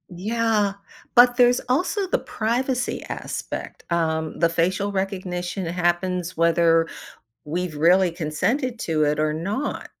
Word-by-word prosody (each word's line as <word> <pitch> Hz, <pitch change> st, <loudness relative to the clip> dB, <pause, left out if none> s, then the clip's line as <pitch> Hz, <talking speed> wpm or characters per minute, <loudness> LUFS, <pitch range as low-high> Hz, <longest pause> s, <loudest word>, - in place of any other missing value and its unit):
Yeah, 215 Hz, 0 st, +1 dB, 0.4 s
but 245 Hz, 0 st, +6 dB
there's 245 Hz, 0 st, +5 dB
also 370 Hz, +9 st, +1 dB
the -, -, +1 dB
privacy 250 Hz, +3 st, -2 dB
aspect. -, -, -6 dB
Um, 160 Hz, -2 st, -1 dB
the 170 Hz, -1 st, +4 dB
facial 185 Hz, +5 st, 0 dB
recognition 185 Hz, -1 st, -3 dB
happens 180 Hz, +1 st, -1 dB
whether 165 Hz, 0 st, +3 dB, 0.6 s
we've 170 Hz, +1 st, -3 dB
really 175 Hz, +4 st, +4 dB
consented 225 Hz, -, -1 dB
to 155 Hz, -2 st, 0 dB
it 150 Hz, 0 st, +1 dB
or 155 Hz, 0 st, +1 dB
not. 200 Hz, -, -3 dB
180 Hz, 120 wpm, -23 LUFS, 165-230 Hz, 0.6 s, but